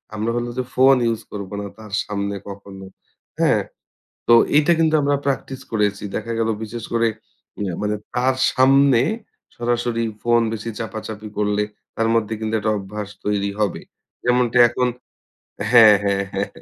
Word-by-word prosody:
আমরা 110 +2 -1
হলো 120 0 -2
যে 130 - 0
ফোন 135 +1 +6 0.2
use 115 - -4
করব 100 -2 -6
না - - -5
তার 105 -2 -11
সামনে 100 -1 -3
কখনো।" 100 -1 -10 0.5
হ্যাঁ? - - +3 0.7
তো 120 - +6 0.2
এইটা 150 +2 +5
কিন্তু 160 -1 +3
আমরা 145 0 +2
practice 135 -1 -2
করেছি। 105 -2 0
দেখা 115 +2 -3
গেলো 115 0 +1
বিশেষ 110 +1 -6
করে 115 0 +3 0.5
ইয়ে 95 -3 -2
মানে 105 0 0 0.2
তার 130 +1 +2 0.2
সামনে 135 -1 +5 0.5
সরাসরি 120 -1 -1 0.2
ফোন 120 0 +3
বেশি 115 +1 -5
চাপাচাপি 110 -1 -6
করলে 105 0 +1 0.3
তার 115 - +1
মধ্যে 110 -1 0
কিন্তু 110 0 -3
একটা 110 +1 0
অভ্যাস 100 +1 -6 0.2
তৈরি 100 -1 0
হবে। 105 -4 0 0.4
যেমনটি 125 -1 +2
এখন 125 +1 0 0.8
হ্যাঁ, 110 -4 +9
হ্যাঁ, 100 -1 +1
হ্যাঁ। 100 +1 -1
110 Hz, 150 wpm, -21 LUFS, 105-120 Hz, 0.8 s, হ্যাঁ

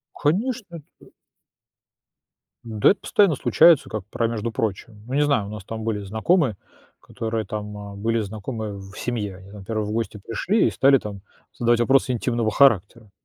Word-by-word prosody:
Конечно, 200 - -1 0.2
это - - -18 1.5
Да, 110 -2 +3
это 200 - 0
постоянно 195 -8 +3
случается, 165 +3 +5
как 110 -3 -5
про 115 - 0
"между 115 0 -3
прочим". 105 0 -4
Ну, 130 - -5
не 145 - +3
знаю, 140 -9 +2
у - - -8
нас 105 -3 -8
там 110 +1 -6
были 110 -2 -2
знакомые, 110 - +1 0.4
которые 110 -2 -4
там, 105 0 -5
а, 100 -1 -8
были 115 +2 0
знакомые 110 +1 -5
в 95 0 -11
семье, 115 -4 -3
и - - -11
они, 95 +1 -14
там 100 -1 -11
первые, 110 0 -2
в 105 - -4
гости 110 -1 -3
пришли 175 - 0
и - - -2
стали 135 0 +4
там 100 -3 -8 0.4
задавать 120 0 +2
вопросы 135 +2 +3
интимного 120 -2 0
характера. 110 -4 +2
115 Hz, 175 wpm, -23 LUFS, 105-135 Hz, 1.5 s, случается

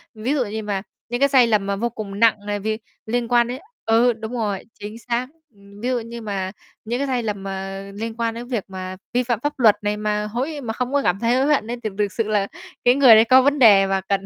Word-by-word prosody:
Ví 225 +6 -2
dụ 270 -5 +1
như 220 +1 -5
mà 200 -2 -2 0.3
những 240 +1 -2
cái 280 +1 +4
sai 260 -3 +5
lầm 210 -3 +2
mà 200 0 -1
vô 235 +4 -1
cùng 205 -3 -7
nặng 215 -2 +3
này 205 0 -2
vì 215 +2 -2 0.3
liên 240 +1 -1
quan 240 0 +3
đến 250 +2 -5 0.3
ừ, 235 +2 +4
đúng 225 +1 -7
rồi, 210 -5 -2 0.2
chính 210 +2 -8
xác 240 +2 -2 0.3
ừm, 200 0 -16
ví 245 - -1
dụ 250 -1 +1
như 230 +1 -8
mà 195 -3 -3 0.3
những 240 +3 -2
cái 280 - -1
sai 250 -3 -1
lầm 205 -3 -3
mà 195 0 -5
liên 225 +2 -5
quan 230 -1 -1
đến 235 +1 -7
việc 235 -6 -2
mà 185 -1 -7 0.2
vi 250 +1 +2
phạm 240 -3 -1
pháp 290 +3 -3
luật 220 -4 +6
này 205 0 -1
mà 210 0 -1
hối 270 +7 -3
mà 230 -4 -4
không 250 +3 -3
có 285 - +3
cảm 180 +2 +1
thấy 235 +2 +2
hối 260 +1 +2
hận 220 - -3
ấy 240 - -3
thì 215 - -1
thực 205 -1 0
sự 225 - 0
là 205 -2 +1 0.4
cái 245 +1 +6
người 265 -5 +8
đấy 220 - +7
có 260 +2 +6
vấn 285 +2 +2
đề 200 -5 +7
mà 195 0 0
cần 195 0 -2
225 Hz, 270 wpm, -22 LUFS, 205-245 Hz, 0.4 s, người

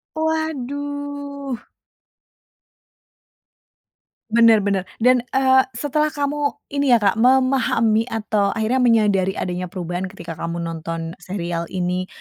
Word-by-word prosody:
Waduh. 285 -3 -3 2.7
Bener 225 -1 +5
bener 195 -2 0 0.2
dan, 250 +2 +5
eee, 265 0 +5
setelah 295 +4 0
kamu 290 0 -1 0.2
ini 280 -2 +2
ya 230 - +1
Kak 200 +2 +3
memahami 245 -3 +3
atau 215 -3 0
akhirnya 225 +3 0
menyadari 210 -6 +3
adanya 180 0 -3
perubahan 180 0 -4
ketika 170 -4 -9
kamu 170 0 -3
nonton 165 0 -4
serial 175 -2 -4
ini, 180 0 -2
225 Hz, 105 wpm, -21 LUFS, 185-275 Hz, 2.7 s, Bener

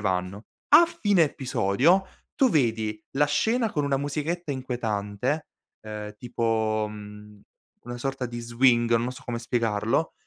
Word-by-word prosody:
vanno. 95 +1 -2 0.2
A 320 +4 +8
fine 205 - +2
episodio 135 - +2 0.3
tu 265 - +4
vedi 110 - 0
la 145 +1 +4
scena 225 +9 +1
con 150 -2 0
una 140 -1 +1
musichetta 150 +3 -3
inquietante, 120 +1 -2 0.3
ehm, 105 -1 -7
tipo, 110 -2 0
mhmm, 105 0 -11 0.4
una 120 +1 -6
sorta 135 0 -3
di 120 0 -6
swing, 120 0 +3
non 120 +2 -1
so - - -12
come 120 -1 -3
spiegarlo, 115 +3 0
120 Hz, 135 wpm, -26 LUFS, 105-145 Hz, 0.4 s, A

